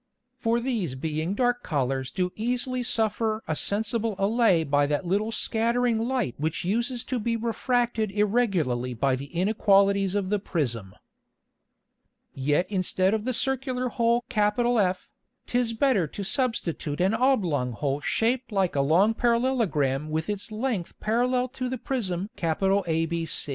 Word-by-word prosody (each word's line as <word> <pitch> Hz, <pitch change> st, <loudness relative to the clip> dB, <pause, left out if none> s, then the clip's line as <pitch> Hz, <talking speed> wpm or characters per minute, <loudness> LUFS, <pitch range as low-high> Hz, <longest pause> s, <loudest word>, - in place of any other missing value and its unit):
For 235 Hz, -2 st, 0 dB
these 225 Hz, -, -2 dB
being 160 Hz, +6 st, -2 dB
dark 245 Hz, +1 st, +1 dB
Colours 135 Hz, -, -1 dB
do 180 Hz, +8 st, -1 dB
easily 250 Hz, +3 st, -1 dB
suffer 220 Hz, -1 st, 0 dB
a 160 Hz, -, -1 dB
sensible 220 Hz, +4 st, 0 dB
Allay 195 Hz, -4 st, +3 dB
by 145 Hz, -1 st, +2 dB
that 150 Hz, +5 st, -1 dB
little 205 Hz, +5 st, 0 dB
scattering 230 Hz, +1 st, +1 dB
Light 240 Hz, -, -1 dB
which 160 Hz, +3 st, -2 dB
uses 235 Hz, +5 st, 0 dB
to 255 Hz, -3 st, -2 dB
be 230 Hz, +1 st, -1 dB
refracted 235 Hz, -1 st, 0 dB
irregularly 195 Hz, -, 0 dB
by 130 Hz, +3 st, +1 dB
the 135 Hz, +2 st, -6 dB
Inequalities 195 Hz, +2 st, +2 dB
of 195 Hz, -1 st, -1 dB
the 210 Hz, -, +2 dB
Prism. 120 Hz, -, -3 dB, 1.4 s
Yet 145 Hz, +6 st, +1 dB
instead 185 Hz, 0 st, +1 dB
of 220 Hz, 0 st, -1 dB
the 255 Hz, -, 0 dB
Circular 255 Hz, 0 st, -1 dB
Hole 235 Hz, -1 st, +1 dB
F, 210 Hz, -3 st, +2 dB, 0.4 s
'tis 245 Hz, -2 st, 0 dB
better 225 Hz, -, +2 dB
to 200 Hz, -, -6 dB
substitute 185 Hz, -, -1 dB
an 190 Hz, +4 st, +2 dB
oblong 180 Hz, -, +1 dB
Hole 140 Hz, +4 st, -2 dB
shaped 235 Hz, -, 0 dB
like 190 Hz, -5 st, 0 dB
a 140 Hz, -, +3 dB
long 175 Hz, +10 st, +4 dB
Parallelogram 220 Hz, -, +1 dB
with 160 Hz, +5 st, -1 dB
its 205 Hz, +1 st, -5 dB
Length 215 Hz, -5 st, -3 dB
parallel 250 Hz, +3 st, +1 dB
to 255 Hz, 0 st, -4 dB
the 260 Hz, -, -3 dB
Prism 205 Hz, -6 st, -2 dB
ABC. 165 Hz, -3 st, 0 dB
205 Hz, 140 wpm, -26 LUFS, 165-235 Hz, 1.4 s, long